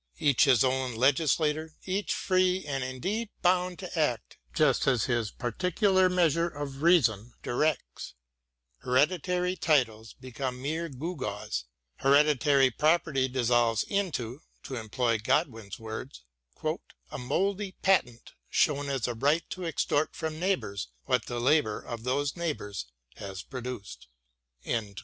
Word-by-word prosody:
Each 145 -2 +4
his 130 -2 +5
own 130 -2 0
legislator, 150 +4 +1
each 195 +2 -1
free 185 -1 +1
and 135 -3 -2
indeed 190 - -3
bound 180 0 +2
to 180 -3 -5
act 125 -7 -1
just 150 -5 +2
as 125 -6 +3
his 120 -4 0
particular 185 - +1
measure 170 -2 +2
of 145 -3 -6
reason 120 - +3
directs: 120 - -2 0.7
MARY 125 - -1
WOLLSTONECRAFT 130 - +7
85 150 - +2
hereditary 180 +1 -1
titles 115 -10 +1
become 130 0 -5
mere 160 +5 -2
gewgaws: 130 - -4 0.4
here 135 +1 +4
ditary 140 -3 +3
property 150 -4 +2
dissolves 120 -3 +2
into— 155 - -2 0.2
to - - -7
employ 115 0 0
God 150 +9 +2
win's 110 -5 -9
words 110 - -7 0.3
— - - -3
" - - -27
a - - -5
mouldy 190 +10 -1
patent 125 -12 +1 0.2
shewn 145 -2 +1
as 135 -5 -1
a 120 - -2
right 145 +8 +1
to 185 -1 -5
extort 155 -2 0
from 160 -1 -4
neighbours 170 - -1 0.2
what 125 -2 +1
the 120 -1 -3
labour 125 -4 +2
of 115 -2 -7
those 140 +3 0
neighbours 105 - -4 0.3
has 95 -2 -7
produced." 125 -5 -7
135 Hz, 140 wpm, -29 LUFS, 120-165 Hz, 0.7 s, WOLLSTONECRAFT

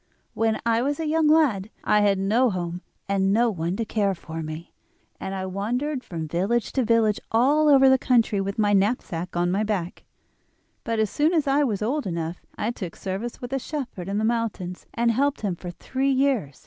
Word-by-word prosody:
When 225 -1 0
I 230 0 +2
was 285 +4 -1
a 325 - -2
young 315 0 +2
lad 275 -11 +3
I 210 - +3
had 200 -1 +3
no 220 +7 +2
home 175 -2 -4 0.3
and 195 -1 +1
no 230 +3 +3
one 170 -1 -2
to 230 - -2
care 205 -3 0
for 165 -1 -7
me, 155 +1 -7 0.5
and 190 - -4
I 190 -1 -3
wandered 245 +9 -2
from 160 -3 -5
village 195 +8 0
to 260 - +1
village 225 -2 +2
all 285 +7 +4
over 270 -2 +7
the 265 0 +5
country 230 -6 +2
with 200 +1 -3
my 205 -1 +2
knapsack 190 -4 0
on 175 0 +1
my 200 +3 +1
back; 195 -5 -3 0.8
but 230 -1 -2
as 220 -2 +1
soon 310 +4 +2
as 310 -3 +2
I 280 +1 +3
was 215 -6 -1
old 270 +3 -1
enough 170 -1 -4
I 220 - -1
took 185 -8 -7
service 200 +5 -5
with 245 +1 -6
a 270 - +1
shepherd 250 - -5
in 200 - -1
the 215 - 0
mountains, 220 -6 -2
and 235 0 +2
helped 280 +5 0
him 200 -5 -1
for 175 +1 -8
three 265 +9 -2
years. 260 - 0
215 Hz, 205 wpm, -24 LUFS, 190-255 Hz, 0.8 s, over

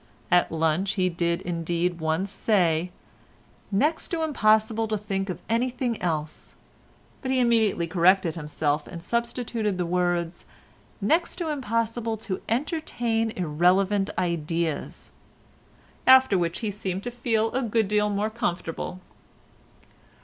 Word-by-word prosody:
At 180 0 +4
lunch 165 +4 +1
he 185 -2 +1
did 170 0 -1
indeed 175 0 -1
once 160 +5 0
say, 180 -5 +1 0.8
"next 295 +11 +1
to 330 -2 -2
impossible 220 -6 +2
to 215 0 -1
think 195 -1 -3
of 180 -1 -5
anything 240 0 -1
else," 155 -3 -3 0.7
but 260 - -4
he 260 0 +2
immediately 225 -7 +2
corrected 175 +1 +3
himself 150 -1 -2
and 170 -2 -8
substituted 235 -3 -2
the 180 - -1
words, 175 -1 -1 0.6
"next 325 - +1
to 335 -3 -3
impossible 230 -4 -1
to 205 -3 -4
entertain 235 -4 -1
irrelevant 185 +4 +2
ideas," 165 -3 -2 1.0
after 260 -4 +7
which 170 +1 -1
he 215 -3 -1
seemed 190 -1 -4
to 245 - -4
feel 225 -2 0
a 260 - 0
good 225 -3 +1
deal 210 +1 +2
more 205 +2 -1
comfortable. 180 -5 -3
200 Hz, 125 wpm, -26 LUFS, 175-230 Hz, 1.0 s, after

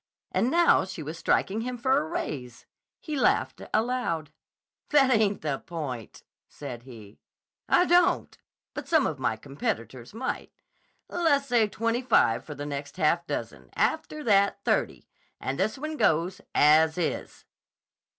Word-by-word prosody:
And 240 - +1
now 340 +4 +4
she 185 -4 -7
was 155 +3 -7
striking 205 +6 +1
him 250 +1 -4
for 260 +3 +2
a - - -2
raise. 125 -5 -5 0.3
He 305 -3 -5
laughed 270 - +1
aloud. 215 -10 -1 0.6
"That 275 -3 +5
ain't 215 -4 +2
the 145 -3 -1
point," 140 -9 -7 0.3
said 130 -5 -8
he. 110 -5 -13 0.5
"I 355 - +5
don't; 350 0 +3 0.4
but - - -6
some 320 -5 +3
of 150 - -2
my 125 - 0
competitors 120 -2 -5
might. 260 +3 -4 0.6
Lessay 280 -9 +2
twenty 230 +3 -1
five 120 - +3
for 150 - -8
the 145 - -6
next 145 0 -6
half 170 +3 +1
dozen: - - -5
after 310 -1 -1
that, 200 -4 +3
thirty, - - 0 0.3
and 135 +1 -3
this 215 +7 0
one 310 +2 -5
goes, 170 - +1
as 155 +2 +5
is." 175 - -3
180 Hz, 140 wpm, -27 LUFS, -, 0.6 s, That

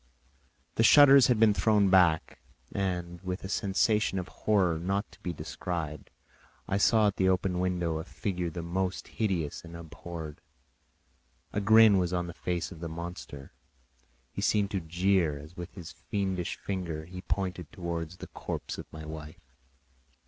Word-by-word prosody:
The 115 - +4
shutters 140 +2 +8
had 120 -4 +2
been 110 -2 +6
thrown 105 -2 +3
back, 90 -4 +3 0.3
and 90 -3 -2
with 90 0 -4
a - - -4
sensation 100 +1 +1
of 90 -1 -4
horror 95 -6 +1
not 100 +4 -2
to - - -18
be 90 - -4
described, 80 -4 -5 0.6
I 100 - 0
saw 110 +1 +4
at 100 - +1
the 95 0 +3
open 90 -1 +1
window 90 -3 0
a - - -4
figure 90 -2 -3
the 85 +1 -6
most 95 +2 -2
hideous 90 -9 -2
and 85 0 -10
abhorred. 85 -1 -8 1.1
A 105 - 0
grin 110 -1 +7
was 90 -1 0
on 90 -1 0
the 85 - -7
face 85 0 -3
of 85 - -10
the 85 0 -5
monster; 85 -4 -7 0.8
he - - -5
seemed 105 -1 +2
to 95 - 0
jeer, 85 -2 +1
as 75 +4 -12
with 90 -1 -8
his 90 -5 -8
fiendish 90 +1 -3
finger 85 -5 -4
he 90 +2 -8
pointed 90 -5 -3
towards 85 -1 -4
the - - -8
corpse - - -5
of - - -10
my 80 0 -8
wife. 75 -4 -10
90 Hz, 165 wpm, -29 LUFS, 85-100 Hz, 1.1 s, shutters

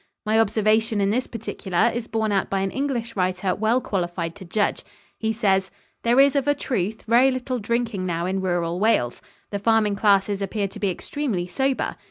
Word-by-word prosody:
My 220 +1 +3
observation 220 +1 +2
in 200 0 +2
this 250 +4 0
particular 225 -2 -1
is 235 0 -4
borne 220 -1 -1
out 195 -1 0
by 195 -1 0
an 195 0 -1
English 250 -4 -2
writer 185 0 0
well 220 +4 +2
qualified 175 -6 -3
to 190 - -10
judge. 205 +4 0 0.4
He 220 0 0
says: 195 -4 +1 0.3
"There 240 +2 +3
is, 275 +1 +5
of 280 -1 +1
a 290 - +3
truth, 220 -6 -2
very 240 +4 +5
little 255 -1 -2
drinking 225 -3 -1
now 170 -1 -1
in 190 +1 -1
rural 175 -2 -1
Wales. 200 - +1 0.3
The 200 - -2
farming 215 -1 +2
classes 200 -1 +2
appear 200 +1 -1
to - - -10
be 200 - +1
extremely 205 -1 -3
sober. 265 +9 -1
215 Hz, 190 wpm, -23 LUFS, 190-235 Hz, 0.4 s, is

